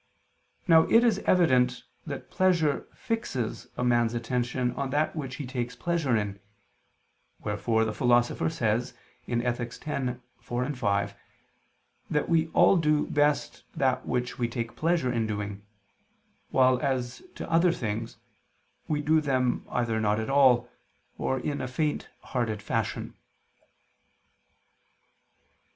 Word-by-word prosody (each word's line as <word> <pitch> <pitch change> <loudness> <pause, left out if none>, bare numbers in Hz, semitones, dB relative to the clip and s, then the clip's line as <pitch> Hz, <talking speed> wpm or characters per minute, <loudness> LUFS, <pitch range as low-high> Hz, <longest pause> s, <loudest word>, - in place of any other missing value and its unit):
Now 165 -2 +6
it 230 +1 +6
is 225 -5 +3
evident 125 -8 +3 0.2
that - - -6
pleasure 170 -6 +2
fixes 135 - -3
a - - -1
man's 120 -1 +2
attention 125 +1 -1
on 140 -1 -3
that 150 +4 0
which 135 -5 -4
he 145 - -5
takes 125 -1 -4
pleasure 160 -5 0
in: 100 -2 -3 1.0
wherefore 110 +2 +1
the 110 - -2
Philosopher 120 +4 +2
says 120 -7 -1 0.3
(Ethic. 120 +2 -2
x, 130 -4 -2 0.2
4, 125 +4 -2
5) 100 -5 0 0.9
that 150 - 0
we 165 -1 +2
all 175 +3 +5
do 150 -2 +2
best 145 0 +1
that 130 -1 +1
which 125 0 -2
we 120 - +1
take 115 -1 -4
pleasure 160 -6 +1
in 115 -2 0
doing, 105 -1 -4 0.9
while 130 -1 +4
as 130 -3 -2
to - - -6
other 170 +1 +4
things, 115 -6 -4 0.7
we 150 -1 -1
do 155 +1 +3
them 130 -4 0
either 115 -3 0
not 105 0 +1
at 110 +4 -3
all, 130 -3 +5 0.5
or 130 - 0
in 145 +3 -3
a 130 - -3
faint 150 +4 -2
hearted 115 -4 -2
fashion. - - -2
125 Hz, 130 wpm, -28 LUFS, 120-150 Hz, 1.0 s, Now